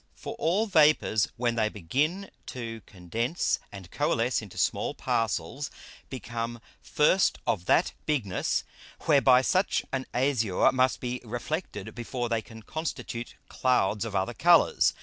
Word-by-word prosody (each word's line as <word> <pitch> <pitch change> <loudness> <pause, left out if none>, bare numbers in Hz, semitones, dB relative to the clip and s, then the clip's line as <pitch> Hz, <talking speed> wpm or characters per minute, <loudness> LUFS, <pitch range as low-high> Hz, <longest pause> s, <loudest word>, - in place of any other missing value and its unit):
For - - -7
all 185 +7 +2
Vapours 155 - +4
when 120 -1 +1
they 110 -2 +1
begin 145 - -1 0.2
to 115 -3 -6
condense 110 - -1
and 95 -3 -10
coalesce - - +1
into - - -11
small - - 0
Parcels, 115 - -1 0.4
become 120 -1 -5 0.2
first 165 +6 +3
of 95 -6 -1
that - - +3
Bigness, 120 -12 0 0.4
whereby 135 -4 +5
such 185 +7 +1
an 130 -1 -3
Azure 120 -7 +2
must 130 0 +1
be 125 0 -3
reflected 120 - -4
before 120 +1 -4
they 115 -1 0
can 110 0 -13
constitute 135 -6 -5
Clouds 110 -5 +1
of 110 -3 -5
other 95 0 0
Colours. - - +4
120 Hz, 130 wpm, -28 LUFS, 110-140 Hz, 0.4 s, whereby